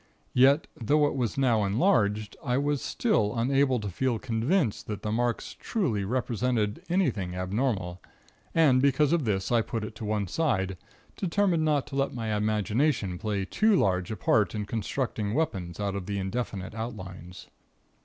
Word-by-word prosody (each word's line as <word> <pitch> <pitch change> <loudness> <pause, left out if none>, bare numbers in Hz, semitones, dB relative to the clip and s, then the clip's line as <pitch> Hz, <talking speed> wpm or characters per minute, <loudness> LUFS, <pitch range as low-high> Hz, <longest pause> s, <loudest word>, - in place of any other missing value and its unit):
Yet, 135 +4 +5
though 145 +6 +2
it 145 - 0
was 125 0 -1
now 120 -6 +3
enlarged, 105 - +1
I 125 -2 0
was 145 0 0
still 125 - +1
unable 130 +1 +2
to 105 - -4
feel 120 +6 0
convinced 120 - 0
that 105 -2 -5
the 105 - -2
marks 120 +1 -1
truly 125 - -1
represented 115 -2 -1
anything 115 - 0
abnormal; 95 -2 -2 0.5
and 145 -6 +5
because 140 +2 +3
of 165 -6 +1
this, 100 -1 -1
I 120 -1 +4
put 115 0 -4
it 110 0 -8
on 110 - -3
one 105 -2 0
side, 95 - 0 0.4
determined 185 -3 +1
not 150 -3 +2
to - - -8
let 135 -1 0
my 110 -3 -2
imagination 105 - 0
play 105 -3 -2
too 215 - +3
large 90 - +1
a 110 - -3
part 105 -3 +2
in 105 -1 -2
constructing 110 -1 -2
weapons 100 - -2
out 100 -1 -1
of 95 -2 -5
the 100 -1 -2
indefinite 95 -1 -3
outlines. 95 -5 -7
115 Hz, 165 wpm, -28 LUFS, 100-135 Hz, 0.5 s, Yet